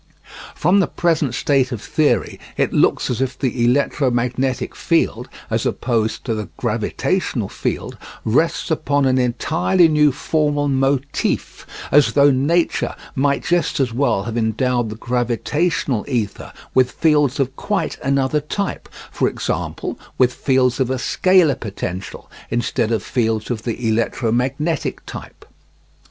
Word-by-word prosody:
From 180 +6 +3
the 185 - +2
present 155 -7 0
state 135 -2 +1
of 120 - -3
theory 120 -2 0 0.2
it - - +1
looks - - +2
as 125 - -2
if 130 -1 -2
the 125 -3 -1
electromagnetic 125 -1 0
field, - - 0 0.2
as - - 0
opposed 115 -3 -1
to 120 - -1
the 105 -2 -4
gravitational - - -1
field, - - -4 0.3
rests 150 +9 +1
upon 145 -3 +1
an 130 0 +3
entirely 160 +8 +2
new 150 -2 +4
formal 145 +1 0
motif, 135 +1 -1 0.2
as 145 -1 +5
though 140 0 +6
nature 150 +6 +1 0.2
might 140 +1 +1
just 175 -3 0
as 125 -4 0
well 120 -6 +1
have 115 +2 -3
endowed 120 +1 0
the 105 - -6
gravitational 125 +4 -1
ether 115 -7 -3 0.2
with 130 -1 +4
fields 150 -4 +2
of 135 0 0
quite 205 +4 -2
another 140 +2 +1
type, 195 +6 -4 0.2
for - - +1
example, - - -3 0.2
with 125 -1 +3
fields 130 -2 +1
of 130 -2 +1
a 130 - 0
scalar 180 +3 +3
potential, 95 -3 -6 0.2
instead 120 -1 0
of 115 - 0
fields 115 -2 -1
of 115 -3 -2
the 115 0 -3
electromagnetic 125 +7 -1
type. - - -10
130 Hz, 135 wpm, -20 LUFS, 120-150 Hz, 0.3 s, though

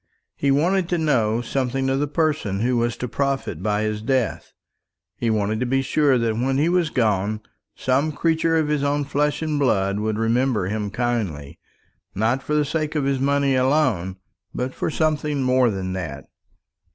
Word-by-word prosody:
He 140 - 0
wanted 175 +6 +2
to 175 - +1
know 120 -8 +1
something 135 +2 -1
of 135 0 +1
the 145 - 0
person 145 - 0
who 125 +2 +1
was 120 0 0
to 125 - -3
profit 135 - -2
by 105 +1 0
his 110 -1 -2
death; 125 -1 -1 0.6
he 120 - -1
wanted 110 0 0
to 125 - -1
be 135 +2 +1
sure 140 -1 +3
that 115 -2 0
when 130 +3 0
he 155 +4 +2
was 175 -3 +2
gone 105 -4 0 0.3
some 135 +4 +1
creature 165 +2 +1
of 155 -2 +1
his 150 -1 0
own 145 0 0
flesh 150 +2 0
and 155 -2 -1
blood 100 -7 +1
would 110 0 -1
remember 115 -1 +1
him 105 +1 -2
kindly; 100 - -3 0.6
not 115 +6 +1
for 150 - -2
the 150 -1 +2
sake 155 +1 -2
of 150 - +1
his 135 -1 0
money 140 0 +2
alone, 130 - +1 0.4
but 125 +1 -2
for - - -2
something 150 -3 0
more 130 -1 +3
than 95 -3 -3
that. 70 -7 -5
130 Hz, 180 wpm, -22 LUFS, 110-145 Hz, 0.6 s, sure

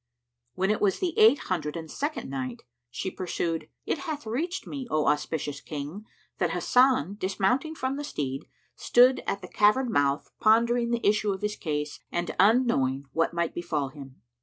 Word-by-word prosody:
When 190 +2 +1
it 215 - -1
was 200 -2 +2
the 360 -3 -1
Eight 225 +6 +7
Hundred 170 - -3
and 160 -1 -7
Second 295 +2 -3
Night, 130 -3 -5 0.3
She 185 +10 -4
pursued, 165 -3 -3 0.2
It - - -1
hath 295 -2 -5
reached 335 +12 -3
me, 275 -4 -6
O 155 -5 +1
auspicious 150 -1 -1
King, 155 +8 -6 0.3
that - - +2
Hasan, 250 - +3
dismounting 200 +12 0
from 265 -1 -2
the 290 - -4
steed, 140 - -4 0.3
stood 250 +2 +4
at 200 - -1
the - - -6
cavern 215 +6 +3
mouth 140 -4 +1
pondering 235 +2 +3
the 235 -2 0
issue 210 0 +2
of 190 - -8
his 210 0 -1
case 150 -4 -3
and 175 0 -2
unknowing 190 - +3
what 165 0 +1
might 170 -1 0
befal 155 -5 -2
him. 135 -2 -12
190 Hz, 170 wpm, -27 LUFS, 150-245 Hz, 0.3 s, Eight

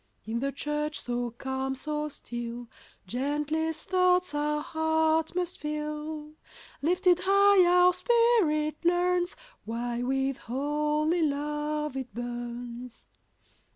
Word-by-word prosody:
In 225 +2 -2
the 275 +2 -1
church 295 +1 -2
so 245 0 -2
calm, 265 +3 -3
so 300 +2 -3
still, 240 -3 -6 0.4
Gentlest 300 - -1
thoughts 365 -3 +3
our 300 0 0
heart 320 +1 +1
must 360 -1 -2
fill. 300 0 -4 0.5
Lifted 355 +3 +3
high, 395 -1 +6
our 360 0 +6
spirit 360 -11 +2
learns 355 +1 +2 0.3
Why 235 +2 -3
with 270 +1 0
holy 300 +6 0
love 300 0 -1
it 260 -2 -5
burns. 240 0 -6
Chorus. - - -43
300 Hz, 110 wpm, -28 LUFS, 265-325 Hz, 0.5 s, high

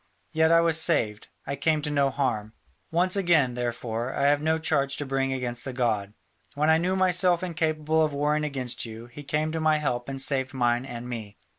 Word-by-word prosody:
Yet 160 +1 +3
I 165 0 +6
was 165 -1 +2
saved, 110 -12 +1 0.2
I 140 - -3
came 155 +1 +1
to 150 - -2
no 140 -1 +2
harm. 125 -6 -2 0.4
Once 180 +3 +2
again, 170 -10 +3
therefore, 120 0 -3
I 140 - -1
have 145 +1 +3
no 160 +1 +1
charge 140 -3 0
to 145 - -3
bring 135 0 -1
against 120 -2 -4
the 130 - -5
god: 110 -5 -1 0.4
when 150 +2 +3
I 160 - +4
knew 185 +3 0
myself 180 -1 +2
incapable 160 -2 0
of 155 - +1
warring 150 +2 0
against 130 -4 -2
you, 115 0 -8
he 120 +4 -11
came 150 +2 -1
to 160 0 -3
my 155 -1 +3
help 125 -4 -2
and 135 0 -5
saved 135 0 -1
mine 120 0 +1
and 120 -1 -7
me. 110 -4 -7
140 Hz, 205 wpm, -26 LUFS, 125-160 Hz, 0.4 s, I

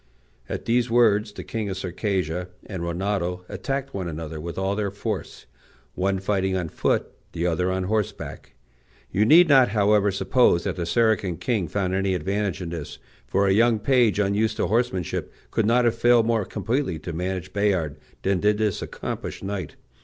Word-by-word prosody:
At - - -4
these 120 +1 +2
words 110 -3 +3
the - - -8
king 110 -3 -3
of 95 - -4
Circassia 90 -2 -2 0.2
and 95 -5 -6
Rinaldo 90 0 -2
attacked 135 0 -4
one 95 -3 -3
another 80 -1 -5
with 85 +1 -6
all 95 +1 0
their 105 -1 -1
force, 100 +1 -5 0.5
one 95 +1 0
fighting 95 -1 0
on 90 -3 -3
foot, - - 0 0.2
the 85 +1 -2
other 90 +2 +1
on 95 0 -1
horseback. 105 +1 -3 0.6
You 105 +3 +2
need 170 +8 +7
not, 135 -4 +6
however, 105 -1 +3
suppose 95 -1 +3
that - - -2
the 85 -2 -3
Saracen 105 -5 +2
king 110 -8 -1
found 95 +2 -1
any 95 0 +1
advantage 95 +2 -2
in 85 - -5
this; 80 -4 -6 0.3
for 100 - +2
a 95 - +3
young 115 +2 +4
page, 120 -2 +3
unused 105 +2 +1
to - - +1
horsemanship, 100 -3 -1 0.2
could 110 - +1
not 120 +2 +4
have 115 - +3
failed 120 -1 +4
more 115 -3 +1
completely 125 - -2
to 85 - -6
manage 90 +2 -3
Bayard 95 -8 0 0.3
than 95 -1 +1
did 105 +2 +2
this 105 -3 0
accomplished - - -5
knight. 95 -4 -4
100 Hz, 175 wpm, -24 LUFS, 90-110 Hz, 0.6 s, need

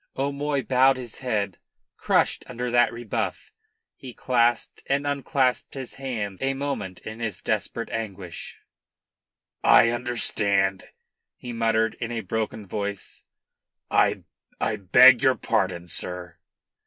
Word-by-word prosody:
O'Moy 140 0 -1
bowed 130 +1 +4
his 120 -3 -8
head, 105 -7 -2 0.4
crushed - - +1
under 125 0 -4
that 120 0 +4
rebuff. 115 -1 -4 0.4
He 125 -3 -10
clasped 120 -2 +1
and 140 +1 0
unclasped 140 -2 0
his 130 -2 -5
hands 110 -8 -5
a 135 0 0
moment 135 -10 -4
in 110 +1 -8
his 110 -5 -3
desperate 115 - -2
anguish. 100 -6 -6 1.1
"I 115 - +7
understand," 105 -5 +1 0.5
he 120 -1 -8
muttered 115 -1 +1
in 115 0 -3
a 115 -1 -2
broken 110 -1 -3
voice, 100 0 -5 0.7
"I - - +2 0.4
I 110 - 0
beg 125 +6 +7
your 130 -1 +4
pardon, 90 -2 -1
sir." 90 0 -5
115 Hz, 120 wpm, -25 LUFS, 100-130 Hz, 1.1 s, I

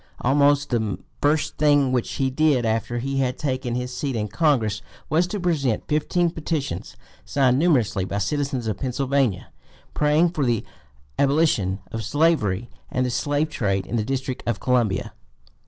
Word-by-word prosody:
Almost 145 +2 +3
the 110 -5 0 0.2
first 150 +1 +1
thing 145 -3 +4
which 125 -2 -1
he 135 -1 0
did 140 -3 +2
after 115 +2 -1
he 135 +3 -2
had 130 -2 0
taken 130 -4 -2
his 125 0 -3
seat 135 -1 -2
in 105 -2 -2
Congress 115 - +1 0.3
was 165 +3 +3
to 205 +3 -4
present 150 - 0
"fifteen 165 +3 +1
petitions 150 - -4 0.3
signed 130 -2 +2
numerously 125 - +2
by 95 +2 -3
citizens 135 +4 -1
of 110 -3 -2
Pennsylvania, 130 -4 0 0.4
praying 150 +3 +3
for 155 -4 -1
the 120 -4 0 0.5
abolition 135 - +2
of 110 0 -4
slavery 120 - +1 0.2
and 130 0 0
the 125 - -1
slave 145 +4 0
trade 100 -7 -1
in 115 - -4
the 110 - +1
District 130 +1 -3
of 115 -4 0
Columbia." 120 -7 0
130 Hz, 155 wpm, -23 LUFS, 115-145 Hz, 0.5 s, thing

